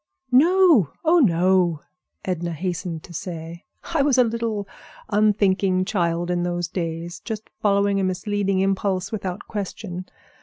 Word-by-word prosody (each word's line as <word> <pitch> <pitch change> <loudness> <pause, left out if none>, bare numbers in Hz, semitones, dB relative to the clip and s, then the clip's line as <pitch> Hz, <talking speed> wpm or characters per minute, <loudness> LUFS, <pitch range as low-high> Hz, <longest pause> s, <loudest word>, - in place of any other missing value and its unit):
"No! 320 - +5
oh, 340 +2 +5
no!" 180 - +3 0.4
Edna 175 -2 -2
hastened 175 -1 -4
to 175 - -12
say. 170 0 -7 0.3
"I 320 - +3
was 275 -2 +3
a 250 - +7
little 225 -3 -2 0.4
unthinking 200 -3 +2
child 175 -3 0
in 175 0 0
those 175 -1 -1
days, 170 0 -4
just 220 -2 -7
following 200 -1 +2
a - - 0
misleading 195 +1 0
impulse 195 0 0
without 195 -3 -4
question. 190 -3 -5
190 Hz, 130 wpm, -23 LUFS, 175-210 Hz, 0.4 s, a